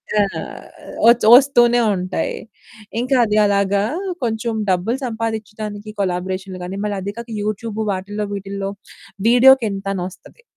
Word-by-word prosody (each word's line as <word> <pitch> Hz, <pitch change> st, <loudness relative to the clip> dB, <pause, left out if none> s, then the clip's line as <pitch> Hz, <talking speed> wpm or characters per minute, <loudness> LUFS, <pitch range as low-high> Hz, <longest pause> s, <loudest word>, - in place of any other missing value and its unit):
అహ్, 205 Hz, -2 st, -1 dB, 0.5 s
వచ్ 235 Hz, +1 st, +6 dB
వస్తూనే 245 Hz, -2 st, +6 dB, 0.2 s
ఉంటాయి. 185 Hz, 0 st, -3 dB, 0.6 s
ఇంకా 255 Hz, +3 st, +1 dB
అది 210 Hz, -1 st, 0 dB
అలాగా 200 Hz, 0 st, +2 dB, 0.4 s
కొంచెం 225 Hz, 0 st, -1 dB, 0.2 s
డబ్బులు 190 Hz, +7 st, 0 dB
సంపాదిచ్చడానికి 220 Hz, -2 st, -5 dB
కొలాబరేషన్లు 185 Hz, 0 st, -3 dB
గాని, 185 Hz, +2 st, -5 dB
మళ్ళీ 205 Hz, -1 st, -2 dB
అది 200 Hz, +2 st, -4 dB
కాక 235 Hz, 0 st, -8 dB
యూట్యూబ్ 215 Hz, +1 st, -4 dB
వాటిలో 205 Hz, +2 st, -4 dB
వీటిలో 195 Hz, 0 st, -4 dB, 0.6 s
వీడియోకింత 235 Hz, -5 st, +5 dB
అని 180 Hz, -, -3 dB
వస్తది, 340 Hz, -, -18 dB
210 Hz, 120 wpm, -19 LUFS, 195-230 Hz, 0.6 s, వచ్